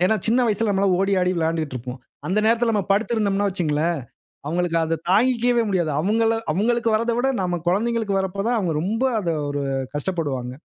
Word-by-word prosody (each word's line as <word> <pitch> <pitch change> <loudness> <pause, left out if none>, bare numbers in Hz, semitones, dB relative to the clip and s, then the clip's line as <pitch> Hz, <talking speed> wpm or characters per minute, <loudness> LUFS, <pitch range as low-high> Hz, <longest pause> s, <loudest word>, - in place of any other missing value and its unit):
ஏன்னா 220 - +2
சின்ன 245 +1 +3
வயசில 215 +1 0
நம்மல்லாம் 195 -2 +2
ஓடி, 195 +1 +1
ஆடி 180 0 +1
விளாண்டுட்டுருப்போம். 140 -6 -3 0.3
அந்த 200 +3 +1
நேரத்தில 230 0 +2
நம்ம 200 -3 0
படுத்திருந்தோம்ன்னா 205 -2 +1
வச்சுக்கங்களேன்! 165 -2 0 0.5
அவுங்களுக்கு 170 +1 0
அத 160 -1 -1
தாங்கிக்கவே 240 +2 +3
முடியாது. 175 -6 0
அவுங்கள 225 +5 +2 0.2
அவுங்களுக்கு 230 +5 +1
வரத 230 +1 0
விட 265 +2 +1
நம்ம 175 -2 -2
குழந்தைங்களுக்கு 215 +1 0
வரப்ப 190 +1 -3
தான், 245 - +1
அவுங்க 175 -6 -1
ரொம்ப 225 +8 -1 0.2
அத 170 -3 -2 0.2
ஒரு 145 0 -2 0.3
கஷ்டப்படுவாங்க. 145 -6 -3
195 Hz, 165 wpm, -22 LUFS, 165-225 Hz, 0.5 s, சின்ன